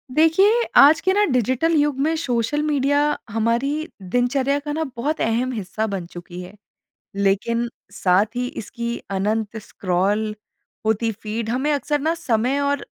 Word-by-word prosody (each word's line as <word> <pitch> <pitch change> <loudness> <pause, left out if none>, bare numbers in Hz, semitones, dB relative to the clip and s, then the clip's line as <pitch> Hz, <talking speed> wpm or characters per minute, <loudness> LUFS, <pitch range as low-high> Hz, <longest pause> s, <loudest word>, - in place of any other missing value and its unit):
देखिए, 385 +9 +4
आज 295 +3 +8
के 375 - +2
ना 410 +1 +3
डिजिटल 260 +7 +1
युग 290 -2 +2
में 315 +4 +1
सोशल 280 -1 -1
मीडिया 285 -1 +2 0.3
हमारी 235 +8 0
दिनचर्या 250 +8 0
का 295 +1 -5
ना 320 +1 -1
बहुत 290 +7 -2
अहम 235 +3 0
हिस्सा 220 -1 -3
बन 195 -4 -4
चुकी 175 +1 -9
है। 180 +2 -10 0.6
लेकिन 205 +4 +1 0.2
साथ 200 +3 +1
ही 250 0 0
इसकी 235 +2 -4
अनंत 210 +3 -1
स्क्रॉल 200 +4 -1 0.5
होती 220 +1 +1
फीड 220 +1 -4
हमें 265 +5 0
अक्सर 290 +1 0
ना 320 +3 +1
समय 250 -3 0
और 285 0 -1
245 Hz, 150 wpm, -22 LUFS, 215-290 Hz, 0.6 s, आज